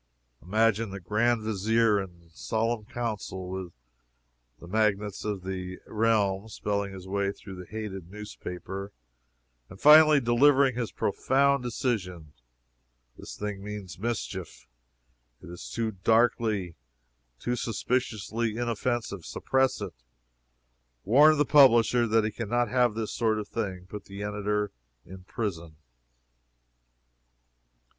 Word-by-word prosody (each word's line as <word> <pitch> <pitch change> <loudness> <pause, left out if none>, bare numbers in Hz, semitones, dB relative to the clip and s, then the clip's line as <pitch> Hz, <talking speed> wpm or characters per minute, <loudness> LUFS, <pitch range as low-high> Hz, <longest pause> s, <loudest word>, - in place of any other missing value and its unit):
Imagine 110 +3 +1
the 95 0 -7
Grand 110 +5 +1
Vizier 110 0 +2
in 85 -3 -12
solemn 115 +3 -2
council 105 -6 -4
with 95 -2 -5 0.9
the - - -12
magnates 105 0 0
of 105 -3 -3
the 90 -1 -5
realm, 105 -2 +1
spelling 100 -1 -2
his 95 -1 -10
way 100 0 0
through 100 -1 -11
the 90 -1 -10
hated 100 -5 -6
newspaper, 100 -1 -7 0.8
and 95 - -12
finally 150 0 +8
delivering 135 +2 +4
his 120 -2 -3
profound 140 +6 +1
decision: 95 - -3 0.8
"This - - -10
thing 105 -2 -5
means 100 -4 -7
mischief 100 - -4 0.7
it 90 - -12
is 85 - -9
too 115 -1 -2
darkly, 110 -2 +1 0.7
too 120 - -1
suspiciously 115 -2 -2
inoffensive 120 -4 -2
suppress 130 +8 0
it! - - -5 1.1
Warn 150 +8 +6
the 150 - +3
publisher 120 -4 +5
that 110 0 +3
we 105 - -1
can 115 -1 -6
not 120 -1 +1
have 125 -3 +2
this 110 -1 -3
sort 110 -2 +1
of 105 -1 -4
thing: 95 -5 -4
put 105 +2 -9
the 100 +1 -7
editor 105 0 -1 0.3
in 95 0 -12
prison!" 85 -8 -4
105 Hz, 120 wpm, -28 LUFS, 95-120 Hz, 1.1 s, finally